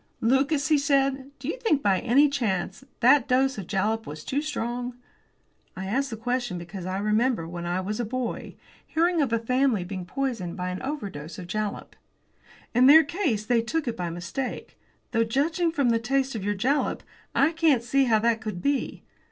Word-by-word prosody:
"Lucas," 275 +5 +2
he 305 -2 +4
said, 275 -1 +1
"Do 255 - -8
you - - -3
think, 310 - +1
by 195 -2 +3
any 260 +5 +4
chance, 215 -6 -2 0.2
that 260 +1 +5
dose 265 -1 +2
of 185 - -7
jalap 215 +3 -1
was 155 +1 -7
too 280 +2 -1
strong? 245 -4 -3 0.8
I 190 - -4
ask 270 +8 0
the 225 - -5
question 245 -3 -2
because 175 +1 -7
I 185 +1 -2
remember, 215 -2 +1
when 175 0 -6
I 180 +2 -1
was 210 +4 -4
a - - 0
boy, 245 +1 -4 0.3
hearing 335 +1 +1
of 270 -5 0
a 230 - +3
family 250 -2 +1
being 185 0 -6
poisoned 235 -9 -3
by 180 0 -2
an 180 - -5
overdose 195 - -5
of 180 - -7
jalap. 210 +3 -4 0.8
In 250 +2 +5
their 315 +3 +9
case 290 - -1
they 235 0 +3
took 290 +6 -2
it 235 - -1
by 175 -4 -3
mistake. 175 +10 -5 0.4
Though, 230 -1 +2
judging 320 +9 0
from 280 -6 +1
the 230 - +2
taste 270 +3 0
of 220 -4 -4
your 205 +1 0
jalap, 260 +9 0 0.3
I 280 +4 +4
can't 315 -7 +2
see 275 +3 +2
how 225 -3 +4
that 225 +1 +1
could 215 -5 -4
be. 280 +6 -1
240 Hz, 195 wpm, -26 LUFS, 205-275 Hz, 0.8 s, their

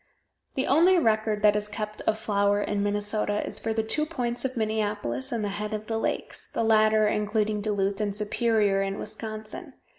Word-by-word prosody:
The 265 - 0
only 345 +6 +5
record 215 -6 +1
that 210 -1 +6
is 210 0 -1
kept 210 0 -5
of 215 - +2
flour 205 -1 +1
in 205 0 -1
Minnesota 205 0 -1
is - - -4
for 225 - -2
the 220 0 0
two 305 +8 +1
points 245 -6 -1
of 260 -1 -3
Minneapolis 210 - -2
and 230 -3 -1
the 205 - -1
head 210 +2 -3
of 215 0 -6
the 225 0 -2
lakes; - - -3
the - - -1
latter 215 -1 +4
including 210 0 0
Duluth, 200 -1 -1
and 205 -1 -1
Superior, 210 -1 +1
in 195 0 -2
Wisconsin. 220 +8 -7
215 Hz, 185 wpm, -26 LUFS, 205-225 Hz, -, that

